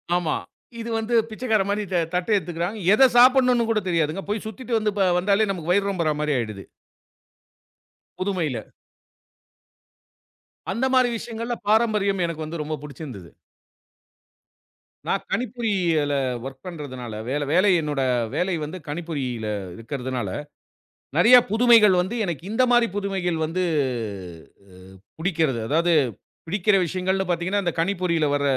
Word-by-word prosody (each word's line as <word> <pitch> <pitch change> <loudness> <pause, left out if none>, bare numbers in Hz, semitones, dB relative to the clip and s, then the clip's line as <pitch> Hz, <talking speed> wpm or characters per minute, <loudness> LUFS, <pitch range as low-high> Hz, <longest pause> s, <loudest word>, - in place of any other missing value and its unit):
ஆமா. 170 -3 0 0.4
இது 230 +1 -5
வந்து 225 +2 -3 0.2
பிச்சைக்காரன்மாரி 215 -3 0
த 180 - +1 0.2
தட்ட 180 +3 -1
எடுத்துக்குறாங்க. 175 +3 -3
எத 220 - +5
சாப்புட்ன்னு 250 -1 +5
கூட 225 -1 +2
தெரியாதுங்க. 165 +2 0
போய் 210 0 -2
சுத்திட்டு 235 +3 -6
வந்து 215 -1 0
ப 190 -2 +3
வந்தாலே 200 +3 +2
நமக்கு 175 -3 -3
வயிறு 200 +2 +3
ரொம்புறமாரி 155 -4 -1
ஆயிடுது. 110 -5 -4 1.6
புதுமையில. 170 - -2 2.0
அந்தமாரி 255 +3 +2
விஷயங்கல்ல 230 +1 -4
பாரம்பரியம் 210 -3 +2
எனக்கு 160 -1 -5
வந்து 160 +2 -6
ரொம்ப 155 +1 -3
புடிச்சுருந்தது. 135 - -9 1.8
நான் - - 0
கணிப்பொறியியல 190 - 0 0.3
ஒர்க் 135 +5 -9
பண்றதுனால 135 -8 -7 0.2
வேல - - -2
வேலை 145 0 -1
வேலை 190 +3 +5
என்னோட 145 -2 -2 0.3
வேலை 180 0 0
வந்து 155 +5 -5
கணிப்பொறியில 145 -8 -4 0.3
இருக்குறதுனால, 125 -1 -4 0.9
நிறைய 230 +9 +8
புதுமைகள் 225 -3 +6
வந்து, 190 +6 -4
எனக்கு 170 -3 -4
இந்தமாரி 240 0 +3
புதுமைகள் 190 -4 -1
வந்து 175 +4 -2 1.1
அ - - -16 0.4
புடிக்கிறது. 160 -8 0
அதாவது 170 +5 +2 0.5
பிடிக்கிற 195 +3 +2
விஷயங்கள்ன்னு 190 +2 -1
பாத்தீங்கன்னா, 185 +4 -1
இந்த 175 - 0
கணிப்பொறியில 170 -4 0
வர 145 - -1
180 Hz, 120 wpm, -23 LUFS, 155-215 Hz, 2.0 s, நிறைய